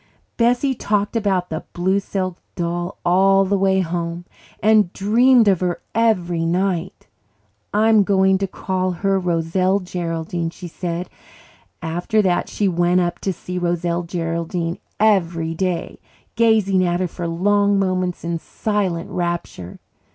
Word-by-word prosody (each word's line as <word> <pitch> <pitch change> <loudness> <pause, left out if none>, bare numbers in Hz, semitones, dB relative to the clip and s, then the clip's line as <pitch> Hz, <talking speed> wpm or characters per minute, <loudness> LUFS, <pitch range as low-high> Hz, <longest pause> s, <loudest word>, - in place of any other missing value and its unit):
Bessie 245 +3 +2
talked 210 -3 -1
about 190 -5 0
the 160 - -3
blue 190 +3 +1
silk 185 -2 -3 0.2
doll 175 +1 -3
all 195 +2 +4
the 200 +1 +1
way 190 -1 +2
home 170 0 -3 0.3
and 215 -3 +4
dreamed 235 +3 +4
of 190 -4 +4
her 180 -1 -1
every 180 -7 +1
night. 180 +1 -1 0.7
"I'm 215 +1 +4
going 190 -1 +3
to 195 - -1
call 185 0 -2
her 195 +2 0
Roselle 180 +2 +1
Geraldine," 170 -2 -3
she 175 +1 -9
said. 175 +1 -4 0.8
After 175 +7 -1
that 180 -2 +1
she 205 - 0
went 175 0 +2
up 175 -1 -1
to 195 - -1
see 180 +1 -5
Roselle 175 0 -1
Geraldine 170 0 -3 0.2
every 170 -6 +2
day, 180 0 -3 0.4
gazing 215 -5 +3
at 175 0 0
her 185 - 0
for 170 +1 -5
long 200 +4 +2
moments 185 -2 -1
in 170 0 -2
silent 190 -4 -2
rapture. 170 - -4
185 Hz, 135 wpm, -20 LUFS, 170-200 Hz, 0.8 s, all